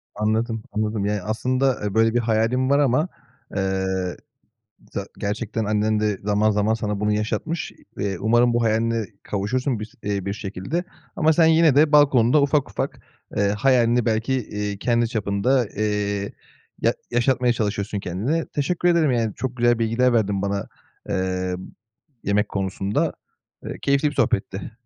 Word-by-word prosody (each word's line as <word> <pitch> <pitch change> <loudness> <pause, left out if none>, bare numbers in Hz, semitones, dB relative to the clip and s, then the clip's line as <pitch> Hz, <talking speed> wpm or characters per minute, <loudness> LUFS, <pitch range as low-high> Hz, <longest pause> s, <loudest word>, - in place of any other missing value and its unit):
Anladım, 110 +2 -1
anladım. 105 -1 -1
Yani 105 -1 -1
aslında, 125 +3 0
eee, 105 - -2
böyle 115 +1 +3
bir 120 - +3
hayalin 115 +3 +1
var 140 - +4
ama, 145 +4 +2 0.5
eee, 95 -1 0 1.1
za 100 0 -4
gerçekten 110 +2 -2
annen 105 +1 +1
de 105 -2 0
zaman 105 +1 +2
zaman 105 +1 +2
sana 105 -2 -3
bunu 105 0 +1
yaşatmış. 120 +10 -2 0.3
Eee, 100 -1 -1
umarım 120 +3 +3
bu 120 - +2
hayaline 115 0 +1 0.2
kavuşursun 120 +4 -1
bir 110 - -3
s 115 - -15
eee, 100 -2 -2
bir 100 - -2
şekilde. 105 - -4 0.3
Ama 160 +1 +4
sen, 160 +1 +4
yine, 160 -3 +5
de 150 +1 +5
balkonunda 140 -2 +5
ufak 140 0 +1
ufak, - - -4 0.4
eee, 100 0 +2
hayalini 120 -2 +3
belki, 110 +3 0
eee, 105 -4 -3
kendi 120 +2 +1
çapında, 110 +3 +1
eee, 100 -1 -1 0.5
ya - - +2 0.2
yaşatmaya 125 +1 +2
çalışıyorsun 105 -2 -2
kendine. 115 - -1
Teşekkür 170 +5 0
ederim, 170 -5 +3
yani, 115 -3 0
çok 130 -1 -4
güzel 120 -1 +3
bilgiler 115 +2 +2
verdin 100 -4 +1
bana, 100 -1 -2 0.4
eee, 95 -1 -1 0.7
yemek 100 +1 +1
konusunda. 95 +1 -1 0.5
Eee, - - -6
keyifli 140 +1 +2
bir - - -10
sohbetti. 105 -6 -1
110 Hz, 150 wpm, -23 LUFS, 100-125 Hz, 1.1 s, yine